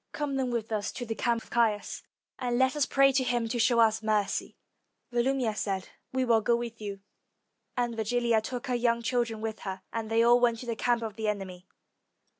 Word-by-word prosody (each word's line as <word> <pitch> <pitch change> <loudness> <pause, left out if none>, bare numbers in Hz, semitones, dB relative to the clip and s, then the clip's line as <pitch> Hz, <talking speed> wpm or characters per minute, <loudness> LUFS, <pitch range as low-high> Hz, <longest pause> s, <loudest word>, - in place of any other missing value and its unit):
Come, 290 -2 -2
then, 265 -2 0
with 230 -2 -3
us 210 -3 -1
to 245 - -5
the 225 - -2
camp 230 +1 0
of - - -20
Caius, 225 -3 +1 0.4
and 245 -2 0
let 260 +2 +3
us 295 -2 +1
pray 275 0 +5
to 265 0 +2
him 240 -2 0
to 240 +1 -1
show 235 +1 +4
us 225 -1 +4
mercy." 210 -2 -1 0.5
Volumnia 245 -1 +1
said, 195 -2 -2 0.2
"We 260 0 0
will 230 -2 +4
go 235 +3 +3
with 235 -1 -5
you." 200 -2 -5 0.8
And 240 -1 0
Virgilia 230 0 +1
took 245 +4 -5
her 255 - -2
young 235 -1 +1
children 230 -3 -1
with 220 -1 -4
her, 190 -1 -6
and 225 -1 -3
they 225 +1 +3
all 240 +1 +6
went 240 -1 +3
to - - -7
the 230 -1 -2
camp 235 +1 +1
of 220 -1 -5
the 220 -1 -2
enemy. 190 -3 -4
235 Hz, 215 wpm, -29 LUFS, 220-245 Hz, 0.8 s, all